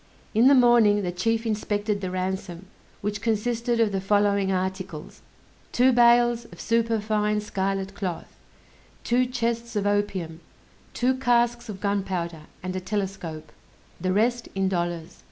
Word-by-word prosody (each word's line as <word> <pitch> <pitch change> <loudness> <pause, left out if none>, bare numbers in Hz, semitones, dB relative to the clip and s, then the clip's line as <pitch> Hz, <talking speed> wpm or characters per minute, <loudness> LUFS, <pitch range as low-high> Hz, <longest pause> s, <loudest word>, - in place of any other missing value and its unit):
In 230 +3 +5
the 280 - +7
morning 235 -5 +5
the 180 - -1
chief 225 +6 -1
inspected 210 -1 -1
the 185 - -3
ransom, 185 -1 -4 0.4
which 205 0 -3
consisted 235 +2 0
of 225 -2 +3
the 195 -1 -1
following 200 0 +2
articles: 185 -3 -4 0.5
two 255 +2 +4
bales 240 -1 +4
of - - -14
superfine 215 -2 +1
scarlet 195 -1 -2
cloth; 185 -4 -5 0.7
two 250 +1 +2
chests 235 -2 -2
of 205 -1 0
opium; 195 -5 -1 0.6
two 250 +2 +2
casks 240 -2 +1
of 195 -2 -6
gunpowder; 185 -6 -2 0.2
and 185 0 -4
a - - -1
telescope; 185 -5 -4 0.5
the 185 +1 0
rest 235 +4 +1
in 195 0 +1
dollars. 175 -3 -3
205 Hz, 135 wpm, -25 LUFS, 190-230 Hz, 0.7 s, the